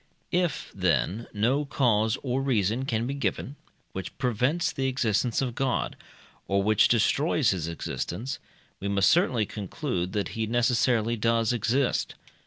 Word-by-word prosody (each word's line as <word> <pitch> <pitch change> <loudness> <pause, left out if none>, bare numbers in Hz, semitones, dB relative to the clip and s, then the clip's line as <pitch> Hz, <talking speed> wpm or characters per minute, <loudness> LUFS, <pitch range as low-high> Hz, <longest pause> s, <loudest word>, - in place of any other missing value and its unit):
If, 175 -2 0
then, 115 +5 0
no 120 +8 +1
cause 115 -6 +1
or 130 0 0
reason 120 -1 +1
can 115 -3 -1
be 135 - -2
given, 140 +1 -2 0.4
which 95 -2 -6
prevents 130 - +1
the 135 0 -1
existence 120 -1 +1
of 125 -3 -2
God, 130 +1 -1 0.5
or 100 0 +1
which 110 0 +4
destroys 135 +5 +2
his 85 -4 -2
existence, 115 +9 -4 0.4
we 100 - -4
must 100 0 +3
certainly 130 - +3
conclude 100 - -4
that 100 -3 -1
he 110 -1 -3
necessarily 120 -1 +2
does 115 +1 +2
exist. 120 +3 0
115 Hz, 140 wpm, -27 LUFS, 105-135 Hz, 0.5 s, which